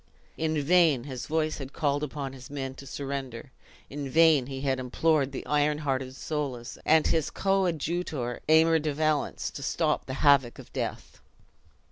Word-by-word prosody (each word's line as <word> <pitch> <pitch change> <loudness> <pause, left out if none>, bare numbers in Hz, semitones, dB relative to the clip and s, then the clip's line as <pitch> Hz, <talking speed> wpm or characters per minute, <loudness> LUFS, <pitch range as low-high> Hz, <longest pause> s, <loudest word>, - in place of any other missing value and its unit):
In 160 -1 0
vain 155 -4 +4
his 130 -4 -6
voice 155 0 -1
had 135 0 -7
called 145 -2 0
upon 140 -2 -4
his 130 -1 -11
men 135 -2 -4
to 140 +1 -12
surrender 135 -2 -5 0.4
in 140 -1 -5
vain 155 -3 +5
he 135 -1 -6
had 135 -2 0
implored 140 +2 +1
the 135 - -6
iron 150 0 +2
hearted 135 -3 -2
Soulis, 135 -6 -4
and 160 0 +5
his 160 -3 +1
coadjutor 170 -8 -1
Aymer 160 +1 +5
de 150 -2 -2
Valence, 155 -1 0
to - - -8
stop 155 +2 0
the 130 - -4
havoc 140 -4 +5
of - - -13
death. - - -5
145 Hz, 160 wpm, -28 LUFS, 135-155 Hz, 0.4 s, vain